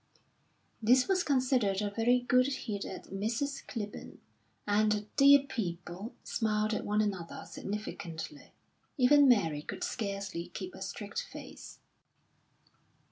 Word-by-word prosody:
This 250 +4 +5
was 380 -1 +3
considered 255 - +2
a 205 -1 -1
very 240 +4 +3
good 250 +1 +3
hit 225 -7 -3
at 190 - -8
Mrs. 230 +8 -2
Clibborn, 210 -5 -6 0.5
and 210 +1 +3
the 210 -1 +1
dear 280 0 +8
people 195 -5 -5
smiled 215 -1 0
at - - -2
one 210 +1 +1
another 190 -5 -4
significantly. 165 -7 -6 0.5
Even 280 +2 +6
Mary 165 - +3
could - - -6
scarcely 200 -6 -3
keep 370 - -7
a - - -11
straight - - -4
face. - - -9
215 Hz, 125 wpm, -31 LUFS, 200-255 Hz, 0.5 s, dear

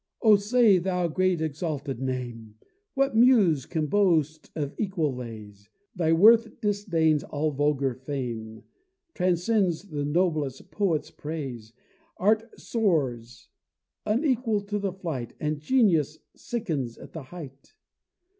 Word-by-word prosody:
O 215 -2 +7
say, 205 -1 +4
thou 180 -1 0
great, 180 +1 +1
exalted 150 -4 -3
name! 120 -4 -5 0.4
What 275 -3 +1
Muse 220 - +4
can 160 -3 -1
boast 160 -4 +1
of 145 -3 -3
equal 175 - -1
lays, 105 -4 -9 0.3
Thy 165 -3 +1
worth 225 +7 +5
disdains 175 -8 +1
all 150 +1 -2
vulgar 140 -2 0
fame, 120 -4 -6 0.5
Transcends 180 0 +1
the 145 -3 -3
noblest 150 -3 -1
poet's 165 -8 -1
praise. 135 -8 -6 0.4
Art 220 +4 +1
soars, 125 - -1 0.6
unequal 235 -2 +1
to 205 +1 -3
the 200 -1 -2
flight, 165 -10 -5
And 150 0 -2
genius 160 - +2 0.2
sickens 155 - -4
at - - -13
the 160 - -6
height. 140 - -11
160 Hz, 115 wpm, -26 LUFS, 135-200 Hz, 0.6 s, O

